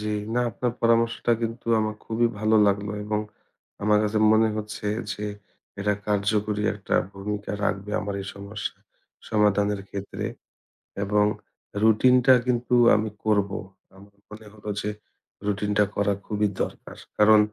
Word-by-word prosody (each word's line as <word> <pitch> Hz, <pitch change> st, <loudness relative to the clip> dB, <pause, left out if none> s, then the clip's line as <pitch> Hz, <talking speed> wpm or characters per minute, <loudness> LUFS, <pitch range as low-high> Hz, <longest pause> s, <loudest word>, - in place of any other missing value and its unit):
জি, 105 Hz, -, -4 dB, 0.3 s
না, 125 Hz, -, +2 dB
আপনার 120 Hz, +2 st, -2 dB
পরামর্শটা 115 Hz, 0 st, +2 dB
কিন্তু 115 Hz, +1 st, -4 dB
আমার 110 Hz, 0 st, -1 dB
খুবই 115 Hz, +1 st, +1 dB
ভালো 110 Hz, +1 st, +3 dB
লাগলো 100 Hz, +1 st, 0 dB
এবং 105 Hz, 0 st, -1 dB, 0.6 s
আমার 105 Hz, 0 st, +4 dB
কাছে 105 Hz, 0 st, 0 dB
মনে 110 Hz, 0 st, +4 dB
হচ্ছে 105 Hz, 0 st, -5 dB, 0.3 s
যে 105 Hz, -, -5 dB, 0.6 s
এটা 105 Hz, +1 st, +2 dB, 0.2 s
কার্যকরী 105 Hz, +1 st, +1 dB
একটা 100 Hz, -, -3 dB, 0.2 s
ভূমিকা 105 Hz, +1 st, -4 dB
রাখবে 100 Hz, +1 st, -2 dB
আমার 100 Hz, -1 st, -4 dB
এই -, -, -9 dB
সমস্যা 100 Hz, +1 st, -6 dB, 0.5 s
সমাধানের 105 Hz, -1 st, +2 dB
ক্ষেত্রে 100 Hz, 0 st, -5 dB, 0.8 s
এবং 105 Hz, +1 st, +3 dB, 0.6 s
routine-টা 125 Hz, +4 st, +6 dB
কিন্তু 125 Hz, 0 st, 0 dB, 0.2 s
আমি 110 Hz, +1 st, 0 dB, 0.2 s
করব। 105 Hz, -2 st, +2 dB, 0.5 s
আমার 100 Hz, +1 st, -16 dB, 0.2 s
মনে 105 Hz, +1 st, -11 dB
হল 105 Hz, 0 st, -18 dB, 0.2 s
যে 105 Hz, -, -2 dB, 0.6 s
routine-টা 105 Hz, +1 st, +1 dB
করা 100 Hz, 0 st, +2 dB
খুবই 105 Hz, 0 st, 0 dB, 0.2 s
দরকার। -, -, -8 dB, 0.2 s
কারণ 105 Hz, 0 st, +7 dB
105 Hz, 135 wpm, -25 LUFS, 105-110 Hz, 0.8 s, কারণ